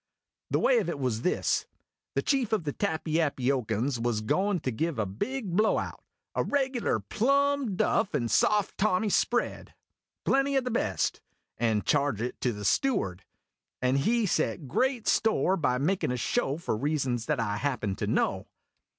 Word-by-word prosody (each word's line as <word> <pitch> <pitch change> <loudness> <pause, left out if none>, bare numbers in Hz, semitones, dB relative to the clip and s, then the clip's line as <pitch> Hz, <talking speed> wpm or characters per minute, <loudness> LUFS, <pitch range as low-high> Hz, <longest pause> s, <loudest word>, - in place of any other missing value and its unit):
The - - +2
way - - +4
of - - -2
it - - -3
was 125 -5 -1
this: 180 - 0 0.5
the - - +1
chief 270 -6 +1
of 210 -6 +1
the 145 -2 -3
Tappyappyocans 140 - 0
was 115 -2 0
goin' 190 - +1
to 130 - -1
give 160 +6 -2
a 110 - 0
big 185 - -3
blow 215 +2 +3
out - - -5 0.3
a - - +1
regular 265 -4 0
plum 280 -1 +1
duff 190 - +1
and 120 -3 -1
soft 205 - +2
Tommy 205 +1 +2
spread: 240 +4 0 0.5
plenty 275 0 +2
o' - - +3
the 250 0 -3
best, 100 - -1 0.4
and 110 -3 +1
charge 140 -6 +1
it 120 +2 -4
to 125 - +1
the 105 -2 -6
steward; 95 - 0 0.5
and 130 +2 +2
he 230 +9 +2
set 160 -4 -1
great 255 - 0
store 215 -4 +3
by 125 -8 +1
makin' 170 +6 0
a 125 - -1
show 140 - 0
for 170 -9 -2
reasons 130 -3 -1
that 150 -4 0
I 105 -3 -1
happen 110 -5 -1
to - - -2
know. - - 0
155 Hz, 170 wpm, -28 LUFS, -, 0.5 s, way